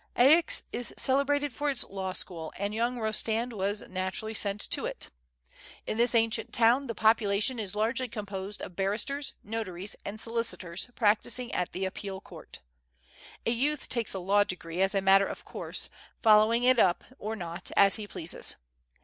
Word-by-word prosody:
Aix 320 Hz, -, +6 dB
is 245 Hz, -, 0 dB
celebrated 280 Hz, +1 st, +2 dB
for 290 Hz, +4 st, -1 dB
its 270 Hz, -3 st, 0 dB
law 190 Hz, -1 st, -5 dB
school, 165 Hz, -3 st, -4 dB
and 200 Hz, +2 st, -2 dB
j^oung 235 Hz, +3 st, 0 dB
Kostand 225 Hz, +1 st, 0 dB
was 205 Hz, 0 st, -2 dB
naturally 190 Hz, +4 st, -3 dB
sent 205 Hz, -1 st, +1 dB
to -, -, +1 dB
it. -, -, -5 dB, 0.8 s
In -, -, -2 dB
this 240 Hz, +1 st, +2 dB
ancient 225 Hz, -1 st, +1 dB
town 240 Hz, +4 st, +3 dB
the 230 Hz, -, -4 dB
population 220 Hz, +2 st, +2 dB
is 205 Hz, -2 st, -2 dB
largely 230 Hz, +4 st, 0 dB
composed 205 Hz, -2 st, -6 dB
of 180 Hz, -, -8 dB
barristers, 215 Hz, +10 st, -1 dB
notaries, 205 Hz, -3 st, -3 dB
and 205 Hz, +2 st, -5 dB
solicitors 230 Hz, -5 st, -1 dB
practising 230 Hz, +3 st, +1 dB
at 180 Hz, -, -1 dB
the 190 Hz, +1 st, -3 dB
Appeal 190 Hz, 0 st, -5 dB
Court. -, -, -10 dB, 0.8 s
A -, -, +2 dB
youth 280 Hz, +5 st, 0 dB
takes 230 Hz, -5 st, 0 dB
a -, -, -2 dB
law 200 Hz, +3 st, +3 dB
degree 180 Hz, -2 st, -5 dB
as 195 Hz, +1 st, +2 dB
a 195 Hz, -, +2 dB
matter 195 Hz, +1 st, +5 dB
of -, -, -7 dB
course, -, -, -3 dB, 0.3 s
following 220 Hz, +2 st, +5 dB
it 255 Hz, -1 st, +4 dB
up 180 Hz, -4 st, +3 dB, 0.2 s
or 220 Hz, +2 st, -4 dB
not 175 Hz, -2 st, -4 dB
as 195 Hz, -1 st, +6 dB
he 210 Hz, -1 st, -6 dB
pleases. 170 Hz, -4 st, 0 dB
215 Hz, 165 wpm, -29 LUFS, 195-235 Hz, 0.8 s, Aix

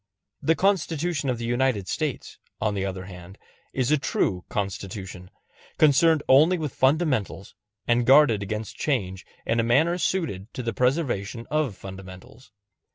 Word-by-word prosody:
The 165 Hz, -, +2 dB
Constitution 165 Hz, -6 st, 0 dB
of 125 Hz, -, 0 dB
the 115 Hz, -, -5 dB
United 120 Hz, -5 st, 0 dB
States, 155 Hz, -5 st, -4 dB, 0.2 s
on 105 Hz, -1 st, 0 dB
the 100 Hz, -1 st, -2 dB
other 95 Hz, -1 st, -4 dB
hand, 90 Hz, +1 st, -11 dB, 0.3 s
is 130 Hz, +1 st, -1 dB
a 150 Hz, -, +3 dB
true 90 Hz, -9 st, -1 dB
Constitution 95 Hz, -2 st, -5 dB, 0.5 s
concerned 155 Hz, +1 st, +4 dB
only 155 Hz, +7 st, +5 dB
with 155 Hz, -5 st, -4 dB
fundamentals, 130 Hz, -, 0 dB, 0.3 s
and 120 Hz, 0 st, +3 dB
guarded 130 Hz, -4 st, +5 dB
against 105 Hz, +2 st, -5 dB
change 95 Hz, -10 st, -2 dB, 0.2 s
in 115 Hz, -, 0 dB
a -, -, +3 dB
manner 155 Hz, +10 st, +2 dB
suited 140 Hz, -, -2 dB
to 125 Hz, -, -4 dB
the 115 Hz, -1 st, -2 dB
preservation 125 Hz, -, -1 dB
of 150 Hz, -8 st, 0 dB
fundamentals. 95 Hz, +4 st, -11 dB
120 Hz, 145 wpm, -25 LUFS, 100-150 Hz, 0.5 s, only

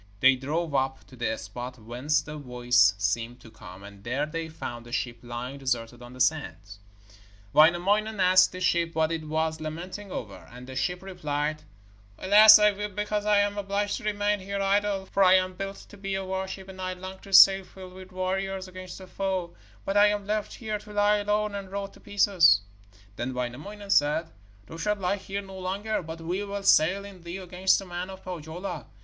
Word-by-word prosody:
They 130 Hz, +3 st, +6 dB
drove 150 Hz, +5 st, -3 dB
up 135 Hz, -1 st, -1 dB
to 130 Hz, -, -14 dB
the 115 Hz, -2 st, -2 dB
spot 120 Hz, +4 st, -7 dB
whence 125 Hz, +7 st, -1 dB
the 150 Hz, -, -8 dB
voice 125 Hz, -6 st, +3 dB
seemed 115 Hz, +4 st, -2 dB
to 115 Hz, -, -14 dB
come, 90 Hz, -1 st, -12 dB
and 100 Hz, 0 st, -13 dB
there 130 Hz, +6 st, -1 dB
they 160 Hz, +1 st, -5 dB
found 120 Hz, -6 st, -7 dB
a -, -, -12 dB
ship 120 Hz, -1 st, -3 dB
lying 125 Hz, +3 st, -6 dB
deserted 120 Hz, -2 st, -2 dB
on 120 Hz, 0 st, -11 dB
the 130 Hz, -, -12 dB
sands. 125 Hz, -8 st, -1 dB, 0.7 s
Wainamoinen 195 Hz, +7 st, +4 dB
asked 185 Hz, 0 st, +5 dB
the 185 Hz, -, -8 dB
ship 170 Hz, -2 st, +1 dB
what 160 Hz, 0 st, +1 dB
it 160 Hz, -1 st, -3 dB
was 160 Hz, +1 st, -1 dB
lamenting 180 Hz, +6 st, -6 dB
over, 100 Hz, -, -7 dB
and 125 Hz, +1 st, -11 dB
the 130 Hz, 0 st, -9 dB
ship 180 Hz, +8 st, -2 dB
replied: 155 Hz, -5 st, -3 dB, 0.6 s
'Alas, 215 Hz, +3 st, +9 dB
I 210 Hz, 0 st, +5 dB
weep 205 Hz, -1 st, -6 dB
because 210 Hz, 0 st, -2 dB
I 205 Hz, -1 st, +5 dB
am 205 Hz, 0 st, -1 dB
obliged 200 Hz, +1 st, -1 dB
to 240 Hz, -, -10 dB
remain 205 Hz, 0 st, 0 dB
here 200 Hz, +1 st, -4 dB
idle; 195 Hz, 0 st, +1 dB
for 195 Hz, +1 st, +1 dB
I 185 Hz, 0 st, +7 dB
was 185 Hz, 0 st, -11 dB
built 195 Hz, +1 st, -6 dB
to 205 Hz, -, -13 dB
be 195 Hz, 0 st, -3 dB
a 195 Hz, 0 st, -3 dB
warship, 190 Hz, 0 st, -4 dB
and 190 Hz, -1 st, -10 dB
I 185 Hz, 0 st, -2 dB
long 185 Hz, +1 st, -9 dB
to 195 Hz, -, -14 dB
sail 195 Hz, 0 st, +8 dB
filled 185 Hz, -1 st, -12 dB
with 185 Hz, 0 st, -12 dB
warriors 190 Hz, +1 st, -2 dB
against 185 Hz, 0 st, -9 dB
the 190 Hz, -, -10 dB
foe, 185 Hz, -2 st, -3 dB, 0.3 s
but 195 Hz, -, 0 dB
I 205 Hz, 0 st, +7 dB
am 205 Hz, -1 st, -1 dB
left 210 Hz, 0 st, -2 dB
here 215 Hz, -3 st, -4 dB
to 210 Hz, 0 st, -13 dB
lie 205 Hz, 0 st, +3 dB
alone 210 Hz, 0 st, 0 dB
and 195 Hz, -2 st, -6 dB
rot 200 Hz, 0 st, -5 dB
to -, -, -17 dB
pieces.' 195 Hz, -, +4 dB, 0.6 s
Then 125 Hz, +2 st, -3 dB
Wainamoinen 150 Hz, +12 st, -5 dB
said: 150 Hz, 0 st, +2 dB, 0.3 s
'Thou 165 Hz, -, -10 dB
shalt 210 Hz, +5 st, 0 dB
lie 195 Hz, +1 st, -1 dB
here 200 Hz, +1 st, -5 dB
no 190 Hz, -1 st, -10 dB
longer, 200 Hz, +4 st, -2 dB
but 165 Hz, 0 st, -8 dB
we 180 Hz, +5 st, -2 dB
will 200 Hz, 0 st, -5 dB
sail 195 Hz, +2 st, +4 dB
in 195 Hz, -3 st, -12 dB
thee 170 Hz, +2 st, -6 dB
against 185 Hz, 0 st, +1 dB
the 195 Hz, -, -6 dB
men 180 Hz, +1 st, -5 dB
of 190 Hz, 0 st, -10 dB
Pohjola. 175 Hz, +1 st, -6 dB
185 Hz, 205 wpm, -27 LUFS, 145-200 Hz, 0.7 s, Alas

